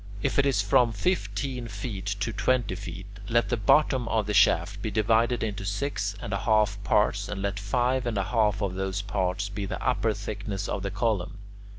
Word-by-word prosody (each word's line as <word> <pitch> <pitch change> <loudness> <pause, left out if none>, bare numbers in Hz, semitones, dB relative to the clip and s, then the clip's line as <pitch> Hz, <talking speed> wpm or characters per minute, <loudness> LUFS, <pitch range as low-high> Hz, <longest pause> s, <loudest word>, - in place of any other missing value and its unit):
If - - +1
it 140 - +4
is 115 -7 +2
from 115 +3 +3
fifteen 120 - -2
feet 100 -1 -6
to 115 0 -1
twenty 120 -1 +1
feet, 95 -1 -7 0.2
let 120 +1 +2
the 120 - +2
bottom 125 +3 +3
of 110 -2 +1
the 105 - -2
shaft 100 0 +3
be 110 - -2
divided 115 +2 +2
into 105 -3 -3
six 100 0 -2
and 100 - -5
a 100 - 0
half 105 -2 +2
parts, 105 0 +2
and 105 - -4
let 100 0 -2
five 125 +5 0
and 115 -3 -1
a 100 - +1
half 105 -1 +1
of 95 -2 -1
those 95 +1 -2
parts 95 0 -1
be 100 0 -4
the 105 - -4
upper 115 -4 +1
thickness 100 -1 -4
of 100 - -2
the 100 - -2
column. 105 -1 -1
105 Hz, 200 wpm, -27 LUFS, 100-115 Hz, 0.2 s, it